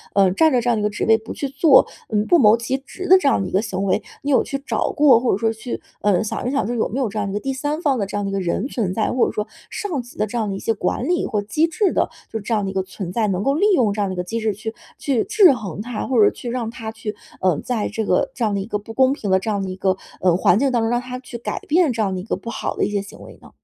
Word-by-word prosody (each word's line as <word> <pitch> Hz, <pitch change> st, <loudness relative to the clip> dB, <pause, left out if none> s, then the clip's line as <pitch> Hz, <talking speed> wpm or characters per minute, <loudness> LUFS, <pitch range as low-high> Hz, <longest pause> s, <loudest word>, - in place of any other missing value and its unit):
呃， 195 Hz, -2 st, +5 dB
占 320 Hz, -, +4 dB
在 250 Hz, -3 st, +2 dB
这 245 Hz, -, 0 dB
样 235 Hz, -, +2 dB
的 -, -, -1 dB
一 -, -, -2 dB
个 210 Hz, -, +2 dB
职 210 Hz, -, -3 dB
位 225 Hz, 0 st, +5 dB
不 220 Hz, 0 st, -8 dB
去 280 Hz, -, -4 dB
做， 275 Hz, +1 st, +5 dB, 0.2 s
嗯， 210 Hz, -1 st, +1 dB
不 345 Hz, -, +5 dB
谋 215 Hz, -2 st, +7 dB
其 235 Hz, +3 st, -2 dB
职 275 Hz, +7 st, -9 dB
的 375 Hz, -, +8 dB
这 370 Hz, -, 0 dB
样 275 Hz, -, +3 dB
的 190 Hz, -, -2 dB
一 -, -, -8 dB
个 190 Hz, -, +2 dB
行 195 Hz, -3 st, -3 dB
为。 200 Hz, +2 st, +1 dB, 0.2 s
你 290 Hz, -, -2 dB
有 265 Hz, -, +4 dB
去 275 Hz, -, -3 dB
找 -, -, 0 dB
过 285 Hz, -6 st, +5 dB
或 240 Hz, 0 st, +1 dB
者 -, -, +1 dB
说 225 Hz, +1 st, +1 dB
去， 225 Hz, +2 st, -6 dB, 0.2 s
呃， 205 Hz, -1 st, +2 dB
想 220 Hz, +2 st, -3 dB
一 -, -, 0 dB
想 280 Hz, -5 st, 0 dB
这 240 Hz, -, -2 dB
有 225 Hz, -, +1 dB
没 245 Hz, -, -3 dB
有 255 Hz, -5 st, 0 dB
这 210 Hz, +2 st, -4 dB
样 205 Hz, -1 st, -2 dB
一 -, -, -5 dB
个 205 Hz, -, -1 dB
第 270 Hz, -, -3 dB
三 290 Hz, +4 st, -2 dB
方 275 Hz, -6 st, +1 dB
的 200 Hz, -, 0 dB
这 195 Hz, -, -7 dB
样 205 Hz, -, -1 dB
的 -, -, -2 dB
一 -, -, -5 dB
个 195 Hz, -, 0 dB
人 190 Hz, +6 st, -1 dB
存 215 Hz, -9 st, -2 dB
在， 220 Hz, -, 0 dB
或 250 Hz, -, +3 dB
者 -, -, -2 dB
说 210 Hz, -, -2 dB, 0.2 s
上 350 Hz, -10 st, -3 dB
级 240 Hz, 0 st, -15 dB
的 215 Hz, -, +1 dB
这 240 Hz, -, -4 dB
样 220 Hz, -3 st, -1 dB
的 195 Hz, -, -3 dB
一 -, -, -5 dB
些 225 Hz, -, 0 dB
管 210 Hz, -, -2 dB
理 350 Hz, 0 st, +1 dB
或 210 Hz, -3 st, -1 dB
机 300 Hz, +11 st, +1 dB
制 370 Hz, +4 st, +1 dB
的， -, -, +1 dB, 0.2 s
就 225 Hz, -, -3 dB
这 215 Hz, +3 st, -3 dB
样 210 Hz, -2 st, +1 dB
的 195 Hz, -, -3 dB
一 -, -, -9 dB
个 190 Hz, -, 0 dB
存 190 Hz, -1 st, -7 dB
在， 220 Hz, +3 st, 0 dB
能 190 Hz, -1 st, -1 dB
够 275 Hz, -, +2 dB
利 345 Hz, -, +2 dB
用 235 Hz, -8 st, +3 dB
这 210 Hz, -, -2 dB
样 200 Hz, -, +1 dB
的 -, -, -3 dB
一 -, -, -7 dB
个 180 Hz, -, -1 dB
机 225 Hz, +6 st, -3 dB
制 220 Hz, -1 st, 0 dB
去 220 Hz, +3 st, -6 dB, 0.3 s
去 265 Hz, -6 st, +1 dB
制 420 Hz, -4 st, +6 dB
衡 205 Hz, -7 st, -5 dB
他。 230 Hz, 0 st, -4 dB
或 245 Hz, -5 st, +4 dB
者 -, -, +5 dB
去 245 Hz, -, -7 dB
让 235 Hz, -2 st, -2 dB
他 225 Hz, -1 st, -6 dB
去， 220 Hz, -1 st, -6 dB, 0.3 s
呃， 185 Hz, -5 st, +2 dB
在 235 Hz, -4 st, -2 dB
这 220 Hz, +1 st, -3 dB
个 180 Hz, -, +1 dB
这 255 Hz, -4 st, -1 dB
样 210 Hz, -, 0 dB
的 200 Hz, -, -1 dB
一 -, -, -5 dB
个 210 Hz, -1 st, -3 dB
不 225 Hz, +2 st, -10 dB
公 260 Hz, +2 st, +4 dB
平 220 Hz, -8 st, -5 dB
的 190 Hz, -, +4 dB
这 210 Hz, -, -4 dB
样 200 Hz, -1 st, -1 dB
的 190 Hz, -, -4 dB
一 185 Hz, -, -5 dB
个， 190 Hz, 0 st, 0 dB, 0.2 s
呃， 180 Hz, -2 st, +4 dB
环 180 Hz, -, +4 dB
境 275 Hz, +1 st, +2 dB
当 240 Hz, -2 st, +1 dB
中， 225 Hz, -, 0 dB
让 240 Hz, +1 st, +1 dB
他 250 Hz, 0 st, -6 dB
去 250 Hz, -1 st, -8 dB
改 235 Hz, -, -4 dB
变 325 Hz, -1 st, +2 dB
这 230 Hz, -2 st, -2 dB
样 195 Hz, -3 st, 0 dB
的 185 Hz, -, -4 dB
一 -, -, -9 dB
个 215 Hz, -, -2 dB
不 230 Hz, -, -8 dB
好 -, -, -3 dB
的 -, -, +2 dB
一 -, -, -2 dB
些 205 Hz, -1 st, 0 dB
行 200 Hz, -, -12 dB
为 -, -, -12 dB
呢？ -, -, -15 dB
225 Hz, 375 characters per minute, -21 LUFS, 200-260 Hz, 0.3 s, 的